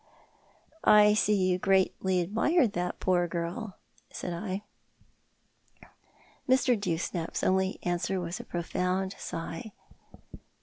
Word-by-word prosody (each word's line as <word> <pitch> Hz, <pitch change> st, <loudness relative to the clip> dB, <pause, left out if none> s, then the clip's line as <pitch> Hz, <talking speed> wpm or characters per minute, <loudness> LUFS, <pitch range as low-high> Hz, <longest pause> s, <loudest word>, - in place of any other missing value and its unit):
" -, -, -35 dB, 0.2 s
I 210 Hz, 0 st, +7 dB
see 210 Hz, 0 st, +3 dB
you 185 Hz, -2 st, +1 dB
greatly 190 Hz, -1 st, +2 dB
admired 225 Hz, -, +2 dB
that 180 Hz, 0 st, -3 dB
poor 175 Hz, -1 st, +2 dB
girl," 175 Hz, +5 st, -4 dB, 0.3 s
said 175 Hz, -, -5 dB
I. 190 Hz, +3 st, -4 dB, 1.9 s
Mr. 260 Hz, -1 st, +4 dB
Dewsnap's 175 Hz, -3 st, -3 dB
only 190 Hz, 0 st, +1 dB
answer 175 Hz, +2 st, -1 dB
was 175 Hz, 0 st, -4 dB
a -, -, -6 dB
profound 180 Hz, +2 st, -2 dB
sigh. 165 Hz, +4 st, -6 dB
185 Hz, 105 wpm, -29 LUFS, 175-205 Hz, 1.9 s, I